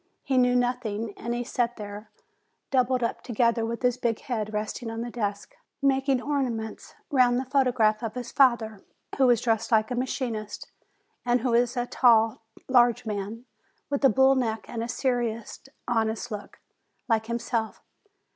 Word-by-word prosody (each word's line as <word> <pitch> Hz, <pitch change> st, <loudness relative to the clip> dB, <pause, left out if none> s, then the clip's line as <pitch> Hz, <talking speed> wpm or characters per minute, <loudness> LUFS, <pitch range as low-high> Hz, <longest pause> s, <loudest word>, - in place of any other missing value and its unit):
He 265 Hz, -2 st, +2 dB
knew 250 Hz, 0 st, +3 dB
nothing. 235 Hz, -4 st, -1 dB
And 235 Hz, +1 st, -4 dB
he 240 Hz, -, -2 dB
sat 240 Hz, 0 st, -1 dB
there, 210 Hz, 0 st, -8 dB, 0.6 s
doubled 255 Hz, -1 st, +2 dB
up 230 Hz, -, -2 dB
together, 235 Hz, -1 st, +1 dB
with 230 Hz, +1 st, -4 dB
his 250 Hz, 0 st, +2 dB
big 235 Hz, -3 st, -1 dB
head 225 Hz, -6 st, -3 dB
resting 215 Hz, +2 st, -4 dB
on 225 Hz, 0 st, -4 dB
the 240 Hz, 0 st, -5 dB
desk, 205 Hz, -4 st, -4 dB, 0.2 s
making 270 Hz, -1 st, +2 dB
orna 280 Hz, -1 st, 0 dB
ments 220 Hz, -2 st, -6 dB, 0.2 s
round 250 Hz, -3 st, +4 dB
the 260 Hz, -, -2 dB
photograph 250 Hz, -5 st, +2 dB
of 225 Hz, -1 st, -4 dB
his 245 Hz, -1 st, -5 dB
father, 230 Hz, -6 st, +2 dB, 0.4 s
who 265 Hz, -, +6 dB
was 240 Hz, -3 st, +4 dB
dressed 225 Hz, -1 st, 0 dB
like 220 Hz, +1 st, +3 dB
a -, -, 0 dB
machinist, 240 Hz, -4 st, -4 dB, 0.5 s
and 245 Hz, 0 st, +2 dB
who 245 Hz, -1 st, 0 dB
is 240 Hz, +1 st, +2 dB
a 245 Hz, -, 0 dB
tall, 225 Hz, -3 st, +3 dB, 0.3 s
large 245 Hz, -3 st, +4 dB
man. 215 Hz, +3 st, -4 dB, 0.5 s
with 285 Hz, 0 st, -1 dB
a 270 Hz, -, +7 dB
bull 265 Hz, +4 st, +5 dB
neck 225 Hz, -4 st, -1 dB
and 230 Hz, -, -4 dB
a -, -, -3 dB
serious, 240 Hz, -3 st, -2 dB, 0.3 s
honest 225 Hz, 0 st, -1 dB
look, 205 Hz, -1 st, -7 dB, 0.5 s
like 220 Hz, -2 st, +1 dB
him 235 Hz, 0 st, -1 dB
self. 230 Hz, -1 st, -3 dB
235 Hz, 170 wpm, -26 LUFS, 220-250 Hz, 0.6 s, a